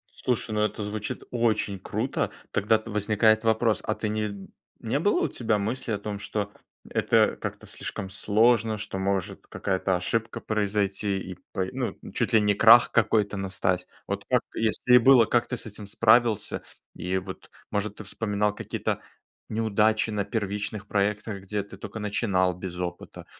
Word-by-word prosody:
Слушай, 120 -3 -1
ну, 105 0 0
это 105 0 -1
звучит 105 0 -4
очень 110 -4 0
круто. 110 +7 -2 0.2
Тогда-то 110 +3 +1
возникает 110 +1 +3
вопрос. 110 0 +2
А 110 - -1
ты 110 - -3
не 105 -2 -3 0.3
не - - -1
было - - +2
у - - +1
тебя 110 -3 0
мысли 110 +4 -3
о 105 - 0
том, 100 0 -5
что 105 0 -3 0.4
это - - +3
как-то - - -6
слишком 95 - -6
сложно, 110 +3 +2
что, 105 -2 -5
может, 95 -1 -2
какая-то 95 -1 -1
ошибка 115 +6 -2
произойти, 100 -1 0
и - - -7 0.2
по 95 -2 -1
ну, 130 -2 -3 0.2
чуть - - 0
ли 110 - +6
не 105 -1 +3
крах 115 +4 +7
какой-то 110 -2 +2
настать? 95 -2 -1 0.2
Вот - - -3
как - - +4
бы - - -5
если 115 +2 +2
и - - +11
было, 125 -1 +7
как 120 +2 +1
ты 125 - -3
с - - -6
этим 105 -1 -8
справился? 115 +1 +3 0.3
И 90 +1 -2
вот, 95 0 -7 0.2
может, 105 0 -1
ты 110 - -8
вспоминал 105 0 -1
какие-то - - -3 0.5
неудачи 110 0 +2
на 105 -1 0
первичных 105 -1 -3
проектах, 105 0 -1
где 100 +2 -3
ты 100 - -12
тока 105 +2 -7
начинал 100 -3 +1
без 90 0 -7
опыта 90 -1 -6
105 Hz, 165 wpm, -26 LUFS, 100-110 Hz, 0.5 s, и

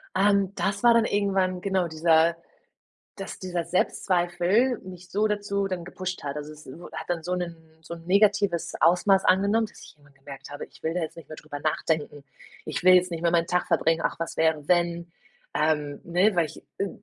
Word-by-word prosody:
Ähm, 200 0 +3
das 200 +2 -2
war 240 -1 +7
dann 230 -1 +4
irgendwann, 190 -3 0
genau, 190 -2 0
dieser 160 +1 +3 0.8
dass 195 - -7
dieser 180 -2 -3
Selbstzweifel 185 +7 +1
mich 185 -1 -11
so 210 +2 +2
dazu 205 -1 -1
dann 180 -3 -4
gepusht 185 0 -6
hat. 140 -1 -4
Also, 150 0 -6
es 150 0 -14
w 170 +7 -11
hat - - -6
dann 175 -2 -1
so 180 +3 -2
'nen 175 -2 -4 0.3
so 170 - -7
'n 165 -1 -10
negatives 200 -2 +2
Ausmaß 190 +3 +4
angenommen, 200 +4 +3
dass - - -16
ich - - -15
irgendwann 145 -1 -24
gemerkt 135 0 -11
habe, 145 0 -7
ich - - -21
will 160 +1 -2
da 180 - 0
jetzt 160 - -5
nicht 165 -4 -13
mehr 155 - -7
drüber 145 -1 -8
nachdenken. 150 -1 -2 0.4
Ich - - -4
will 185 0 +8
jetzt 180 0 +3
nicht 165 -1 -4
mehr 170 - +2
meinen 170 -1 +2
Tag 180 +1 0
verbringen. 165 0 +2
Ach, - - 0
was 165 - -4
wäre, 160 -2 +1
wenn? 170 -1 +1 0.4
Ähm, 150 -2 0
ne, 180 +4 +2
weil 170 -2 +2
ich, 155 - -13 0.2
äh, 200 - 0
175 Hz, 205 wpm, -26 LUFS, 160-195 Hz, 0.8 s, will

